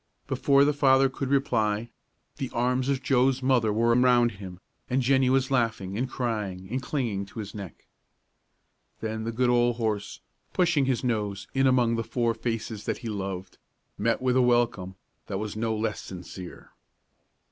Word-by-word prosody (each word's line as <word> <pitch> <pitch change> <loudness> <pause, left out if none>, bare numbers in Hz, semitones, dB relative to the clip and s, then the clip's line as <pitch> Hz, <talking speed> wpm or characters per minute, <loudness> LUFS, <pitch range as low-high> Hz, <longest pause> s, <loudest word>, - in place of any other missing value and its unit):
Before 140 0 +3
the 150 - +2
father 135 -1 +4
could 135 0 -4
reply, 115 -5 +1 0.5
the 135 - -3
arms 125 +2 +1
of 135 -2 0
Joe's 130 0 +2
mother 125 -5 +3
were 115 +2 +3
around 125 -1 +4
him, 95 -3 -10 0.3
and 130 +1 +1
Jennie 130 0 +3
was 130 0 +2
laughing 115 -7 0
and 125 +4 -1
crying 105 -8 -3
and 130 +2 -1
clinging 120 -8 -2
to - - -15
his 100 -2 -6
neck. 100 -5 -9 1.1
Then 110 0 -4
the 115 - -2
good 125 +2 +2
old 120 0 +3
horse, 110 -3 -2 0.3
pushing 170 -6 +2
his 130 -2 0
nose 105 -5 -2
in 135 0 +3
among 120 -3 +3
the 115 - -1
four 115 0 0
faces 115 -2 -4
that - - -1
he - - -2
loved, 95 -2 -5 0.4
met 115 +4 0
with 125 -1 +2
a 130 - +5
welcome 120 -7 +1 0.3
that 95 - -3
was 105 0 -4
no 110 0 -1
less 110 0 -2
sincere. 90 0 -9
120 Hz, 170 wpm, -27 LUFS, 105-130 Hz, 1.1 s, a